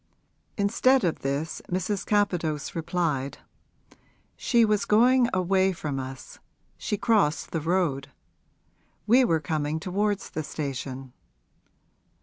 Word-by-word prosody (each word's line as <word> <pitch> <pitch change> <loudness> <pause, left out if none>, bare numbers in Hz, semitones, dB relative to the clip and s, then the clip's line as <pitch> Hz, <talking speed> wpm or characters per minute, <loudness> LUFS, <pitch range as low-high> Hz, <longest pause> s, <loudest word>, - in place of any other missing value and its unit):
Instead 230 +6 +3
of 170 -3 0
this 140 +4 -3
Mrs. 190 +2 -2
Capadose 175 -8 0
replied, 160 -5 -2 1.0
'She 235 -3 +3
was 210 -1 +1
going 245 +3 +4
away 190 +1 +2
from 145 -5 -4
us 130 0 -8 0.4
she 210 - -3
crossed 200 -9 +1
the 165 - -2
road. 160 -5 0 1.0
We 245 +5 +5
were 165 -9 +2
coming 150 0 -2
towards 200 +3 -1
the 155 - -3
station.' 135 -3 -5
175 Hz, 110 wpm, -26 LUFS, 150-205 Hz, 1.0 s, We